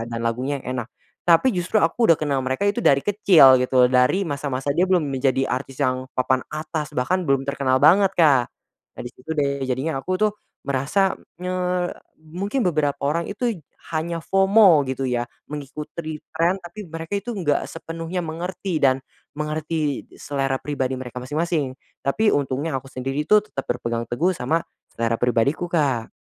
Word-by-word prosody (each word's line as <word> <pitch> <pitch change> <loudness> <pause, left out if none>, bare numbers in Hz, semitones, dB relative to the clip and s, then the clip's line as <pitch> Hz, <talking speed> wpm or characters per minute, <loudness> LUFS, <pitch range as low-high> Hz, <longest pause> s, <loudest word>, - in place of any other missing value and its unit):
dan 115 0 -4
lagunya 130 +4 -2
yang 130 0 -4
enak. 120 - -8 0.4
Tapi 175 +10 +5
justru 180 +3 -1
aku 170 +6 +3
udah 165 - +7
kenal 145 -3 0
mereka 130 +8 -1
itu 200 - -5
dari 140 0 +4
kecil 175 -11 +6
gitu 125 0 +3
loh, - - -2
dari 125 +10 +3
masa-masa 140 -4 -3
dia 180 - +3
belum 175 -6 +1
menjadi 135 0 +1
artis 130 +1 -4
yang 130 0 0
papan 130 0 +1
atas 155 -1 -4
bahkan 180 +9 0
belum 135 -2 +2
terkenal 140 -2 +1
banget 190 +6 +5
Kak. 145 -7 +5 0.5
Nah - - -8
di 120 - -6
situ 125 +6 -13
deh, 140 -2 0
jadinya 135 +4 -1
aku 185 +7 -2
tuh 215 -1 +2 0.3
merasa 150 +9 +1 0.2
nye 180 0 -3 0.7
mungkin 185 - -3
beberapa 150 -4 +1
orang 165 +4 0
itu 240 +4 -1 0.5
hanya 165 +2 -1
FOMO 195 -4 +5
gitu 130 +1 -2
ya, 120 -1 0 0.2
mengikuti 150 +2 -6
trend 175 +4 +1
tapi 180 +4 -9
mereka 165 +4 -4
itu 220 +4 -4
enggak 165 -9 0
sepenuhnya 165 +2 -5
mengerti 175 +3 -4
dan 135 -1 +4 0.4
mengerti 155 -1 -2
selera 135 -2 -1
pribadi 130 -3 -2
mereka 125 -1 -7
masing-masing. 150 -1 -1 0.3
Tapi 210 +11 +2
untungnya 140 +2 -1
aku 135 - -15
sendiri 135 +3 -3
itu 210 - +7
tetap 135 -10 -6
berpegang 120 -1 -2
teguh 165 +10 +1
sama 155 +5 0 0.3
selera 115 0 -1
pribadiku 130 +8 +1
Kak. 135 -9 0
150 Hz, 165 wpm, -23 LUFS, 130-170 Hz, 0.7 s, udah